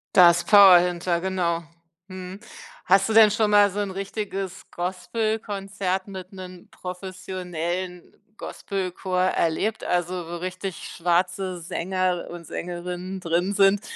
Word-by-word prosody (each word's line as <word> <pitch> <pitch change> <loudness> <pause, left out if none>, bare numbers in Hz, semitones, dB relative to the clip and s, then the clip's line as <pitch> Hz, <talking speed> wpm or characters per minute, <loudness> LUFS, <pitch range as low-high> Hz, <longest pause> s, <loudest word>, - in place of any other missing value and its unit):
Da 175 -2 +9
ist 170 0 -2
Power 195 -4 +9
hinter, 175 -1 0
genau. 175 -3 -1 0.4
Mhm. 185 +1 -8 0.5
Hast 195 +2 +4
du 220 - -1
denn 220 -1 +8
schon 215 0 +1
mal 205 -1 +6
so 205 +2 -5
'n 200 -2 -2
richtiges 195 -1 -5
Gospelkonzert 195 0 -2
mit 190 -1 -9
'nen 185 -1 -10
professionellen 180 -1 -5 0.2
Gospelchor 185 -3 -4
erlebt, 185 +4 0
also 180 0 -1
wo 175 0 -5
richtig 185 0 -5
schwarze 180 +1 0
Sänger 180 +1 -1
und 170 -2 -9
Sängerinnen 180 +2 -5
drin 175 +2 0
sind 200 0 +4
185 Hz, 125 wpm, -24 LUFS, 175-195 Hz, 0.5 s, Da